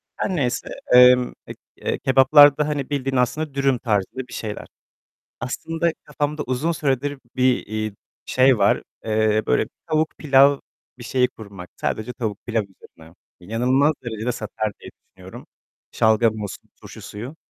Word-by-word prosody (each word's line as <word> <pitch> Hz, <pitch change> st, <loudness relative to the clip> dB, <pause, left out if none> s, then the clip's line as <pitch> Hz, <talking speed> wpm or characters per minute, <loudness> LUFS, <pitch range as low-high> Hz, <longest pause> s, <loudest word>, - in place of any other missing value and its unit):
Her 190 Hz, -, -2 dB
neyse. 125 Hz, -7 st, -2 dB, 0.2 s
Emm, 125 Hz, 0 st, +6 dB
eee, -, -, -8 dB, 0.2 s
e -, -, -3 dB
kebaplarda 145 Hz, +2 st, +6 dB
hani 145 Hz, -3 st, -3 dB
bildiğin 135 Hz, -2 st, -2 dB
aslında 135 Hz, +4 st, 0 dB
dürüm 135 Hz, -2 st, +1 dB
tarzında 115 Hz, +3 st, -2 dB
bir -, -, -13 dB
şeyler. 105 Hz, -2 st, -6 dB, 0.7 s
Aslında 165 Hz, +7 st, -2 dB
kafamda 150 Hz, 0 st, -3 dB
uzun 130 Hz, +7 st, -1 dB
süredir 145 Hz, -2 st, -1 dB, 0.2 s
bir, 130 Hz, -1 st, +2 dB
iii, 110 Hz, 0 st, -4 dB, 0.3 s
şey 130 Hz, -2 st, +4 dB
var. 100 Hz, -, +3 dB, 0.2 s
Eee, 110 Hz, -1 st, +1 dB
böyle -, -, +2 dB, 0.2 s
tavuk 155 Hz, -1 st, +1 dB
pilav 140 Hz, -1 st, +5 dB, 0.4 s
bir 120 Hz, -, -10 dB
şeyi 125 Hz, +1 st, +1 dB
kurmak. 100 Hz, -7 st, -12 dB
Sadece 110 Hz, +3 st, -3 dB
tavuk 110 Hz, -4 st, -4 dB
pilav 115 Hz, -2 st, 0 dB
üzerine. 85 Hz, -4 st, -18 dB, 0.3 s
İnanılmaz 125 Hz, -, +1 dB
derecede 115 Hz, +1 st, -3 dB
satar 110 Hz, -2 st, -4 dB
diye -, -, -11 dB, 0.3 s
düşünüyorum. -, -, -12 dB, 0.5 s
Şalgam 110 Hz, 0 st, +2 dB
olsun, 100 Hz, -2 st, -8 dB
turşu -, -, -12 dB
suyu... 120 Hz, +9 st, -8 dB
125 Hz, 140 wpm, -22 LUFS, 110-140 Hz, 0.7 s, Emm